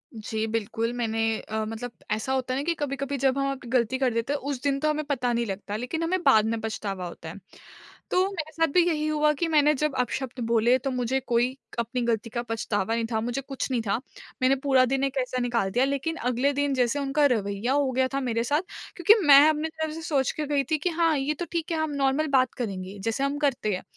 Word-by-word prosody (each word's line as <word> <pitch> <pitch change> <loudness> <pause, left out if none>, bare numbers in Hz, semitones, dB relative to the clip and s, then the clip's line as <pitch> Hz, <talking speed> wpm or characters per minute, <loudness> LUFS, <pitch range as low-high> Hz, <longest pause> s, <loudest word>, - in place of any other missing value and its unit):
जी, 220 0 -3
बिल्कुल, 225 +1 -2
मैंने 225 -2 -1 0.2
अ, 220 0 -3
मतलब 225 +2 -5 0.2
ऐसा 220 +5 -1
होता 255 -1 -1
है 265 - -1
ना - - -2
कि 340 - +1
कभी-कभी 275 -1 -2
जब 265 +1 +1
हम 275 0 0
अप 260 -2 -7
गलती 250 0 +2
कर 260 -3 +1
देते 230 +5 -1
हैं, 290 - -1
उस 275 -2 -4
दिन 280 -1 +1
तो 305 +2 +1
हमें 305 0 -1
पता 250 -4 0
नहीं 235 0 0
लगता, 200 0 -5
लेकिन 250 +9 -3
हमें 365 +2 0
बाद 220 -7 +5
में 225 0 -1
पछतावा 200 -4 -4
होता 165 -1 -9
है। 200 - -9 0.7
तो - - +3
मेरे 315 -4 -5
साथ 325 +1 +2
भी 360 - +6
यही 305 -2 0
हुआ 300 0 +3
कि 340 - +1
मैंने 300 0 +5
जब 300 0 -1
अपशब्द 250 +1 -2
बोले, 235 +2 +4
तो 270 +1 -3
मुझे 250 +1 0
कोई 250 0 0 0.2
अपनी 235 +2 -2
गलती 230 -1 -1
का 240 +1 -3
पछतावा 225 -2 -2
नहीं 230 -1 0
था, 220 - +1
मुझे 245 +3 -2
कुछ 270 0 -4
नहीं 240 -3 +1
था। 195 - +2 0.5
मैंने 260 +1 +4
पूरा 265 -2 +4
दिन 270 +2 0
एक 275 0 -1
ऐसा 255 0 -3
निकाल 235 -6 0
दिया, 250 +5 +3
लेकिन 280 +4 -2
अगले 250 +3 +1
दिन 285 0 0
जैसे 255 +2 +1
उनका 280 +2 +2
रवैया 200 +3 -2
हो 280 -2 +2
गया 260 +1 +2
था 275 - +1
मेरे 230 -2 0
साथ, 290 +6 +1 0.3
क्योंकि 355 +4 +6
मैं 280 -1 +10
अपनी 310 +1 -1
तरफ 315 -1 -4
से 325 - -6
सोच 275 -5 +1
के 305 - -3
गई 285 -1 +1
थी 310 - +3
कि, 355 +5 -1
"हाँ, 330 -2 +2
ये 280 +3 0
तो 350 - -2
ठीक 335 0 -2
है। 325 - 0
हम 315 -1 -1
नॉर्मल 280 +3 +1
बात 255 -1 +2
करेंगे, 195 -4 -5
जैसे 225 +6 -1
हम 280 +1 0
करते 255 -8 0
हैं।" 185 - -7
260 Hz, 245 wpm, -26 LUFS, 230-285 Hz, 0.7 s, मैं